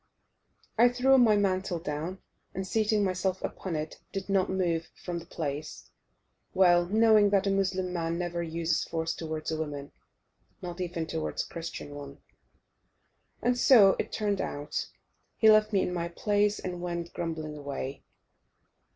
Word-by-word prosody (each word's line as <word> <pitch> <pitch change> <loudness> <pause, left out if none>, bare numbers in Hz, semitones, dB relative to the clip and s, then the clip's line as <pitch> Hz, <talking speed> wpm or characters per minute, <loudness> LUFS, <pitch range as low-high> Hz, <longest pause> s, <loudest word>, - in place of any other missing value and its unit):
I 240 +1 +7
threw 260 +2 +4
my 225 -4 +6
mantle 185 -2 0
down, 160 +4 -5 0.3
and 190 - -3
seating 215 +1 +1
myself 185 0 0
upon 185 -4 -4
it, 155 0 -4
did 195 0 -5
not 195 -1 +2
move 175 -3 0
from 175 -1 -5
the 170 - -13
place, 150 -3 -5 0.6
well 175 -2 +5
knowing 215 0 +5
that 200 -1 +2
a 195 - +2
Mussulman 185 -3 -1
never 175 -1 -2
uses 165 0 -1
force 165 0 -2
towards 155 -1 -4
a 160 - -1
woman, 145 -2 -5 0.7
not 175 0 -6
even 170 -2 -3
towards 160 0 -3
a - - -12
Christian 165 -3 -6
one. 140 -1 -9 1.3
And 245 0 +3
so 225 -6 +6
it - - -2
turned 205 -2 -1
out; 145 +1 -3 0.5
he 220 -1 +7
left 215 0 +4
me 195 -2 +3
in 180 - -2
my 170 -1 -2
place 205 +4 +1
and 180 -1 -5
went 170 -1 -4
grumbling 160 -2 -4
away. 140 -2 -5
180 Hz, 150 wpm, -29 LUFS, 165-200 Hz, 1.3 s, I